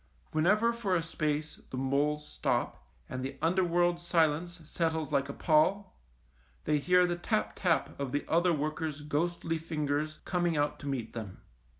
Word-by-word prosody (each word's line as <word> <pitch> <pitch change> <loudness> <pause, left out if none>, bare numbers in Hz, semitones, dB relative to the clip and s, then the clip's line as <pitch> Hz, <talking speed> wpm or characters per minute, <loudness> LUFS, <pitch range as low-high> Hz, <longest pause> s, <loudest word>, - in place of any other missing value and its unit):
Whenever 210 +9 +3
for 210 -6 0
a 165 - +1
space 155 -1 -2
the 130 - -5
moles 145 +3 0
stop, - - -2 0.2
and 130 0 -5
the 135 +1 -5
underworld 175 +1 +2
silence 170 0 +1
settles 160 -2 -1
like 140 0 +1
a - - -4
pall, 180 +8 +2 0.7
they 150 - +2
hear 180 +4 +4
the 175 -1 0
tap 215 +5 -1
tap 170 -6 0
of 140 -2 -2
the 145 - -1
other 175 +2 +3
workers' 155 -1 -2
ghostly 165 +2 -1
fingers 155 -1 -2
coming 175 -3 0
out 145 0 0
to 145 - -7
meet 130 -5 -3
them. 110 -5 -7
155 Hz, 160 wpm, -31 LUFS, 145-175 Hz, 0.7 s, hear